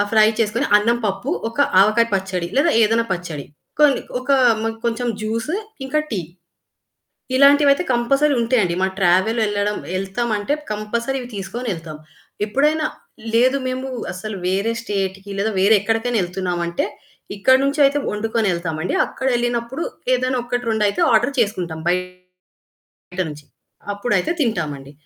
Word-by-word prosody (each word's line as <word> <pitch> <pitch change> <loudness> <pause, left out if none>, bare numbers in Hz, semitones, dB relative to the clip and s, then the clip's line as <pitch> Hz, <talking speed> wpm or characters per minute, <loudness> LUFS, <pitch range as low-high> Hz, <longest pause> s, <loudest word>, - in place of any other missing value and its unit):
ఆ - - +5
ఫ్రై 215 -1 +6
చేసుకొని 220 +1 +1
అన్నం, 230 +3 +2
పప్పు 195 +7 -2 0.2
ఒక 230 - -12 0.2
ఆవకాయ 215 +4 +4
పచ్చడి 190 -2 -2
లేదా 280 - +4
ఏదైనా 225 +2 +3
పచ్చడి. 170 -5 -5 0.3
కొన్ని 295 -3 +5 0.2
ఒక 255 - -5 0.3
మా 225 - 0 0.2
కొంచెం 235 +1 -1
జ్యూసు 230 - -2 0.3
ఇంకా 305 +3 0
టీ. 205 -6 -1 1.2
ఇలాంటివయితే 280 +3 +5
కంపల్సరీ 275 +5 +2
ఉంటాయండి. 225 -7 +1
మా 190 - +3
ట్రావెల్ 190 +5 +3
ఎళ్లడం 205 0 -1 0.2
ఎళ్తాం 195 +5 -2
అంటే, 205 +8 -1 0.2
కంపల్సరీ 235 +5 -2
ఇవి 245 - -9
తీసుకొని 205 +5 -4
ఎళ్తాం. 160 -2 -9 0.5
ఎప్పుడైనా 300 +7 +1 0.5
లేదు 255 +4 +4
మేము 260 +1 -3 0.3
అసలు 200 +3 -6
వేరే 195 +5 +1
స్టేట్‌కి 195 -2 -3
లేదా 215 +2 0
వేరే 200 +3 +5
ఎక్కడికైనా 225 +3 0
ఎళ్తున్నాము 180 -1 -3
అంటే 170 - -1 0.5
ఇక్కడి 260 +6 +4
నుంచి 280 +2 0
అయితే 275 +1 +2
వండుకొనెళ్తాం 210 -7 -1
అండి. 180 - -2
అక్కడ 265 - -4
ఎళ్ళినప్పుడు 240 +4 -2 0.3
ఏదైనా 255 0 0
ఒకటి, 245 0 -2
రెండయితే 210 -2 +1
ఆర్డర్ 240 +6 +3
చేసుకుంటాం 180 -8 -1
బయట 180 0 -5 0.9
నుంచి. 150 0 -10 0.5
అప్పుడైతే 205 - 0
తింటాం 175 - 0
అండి. 135 +1 -13
220 Hz, 140 wpm, -20 LUFS, 190-245 Hz, 1.2 s, ఫ్రై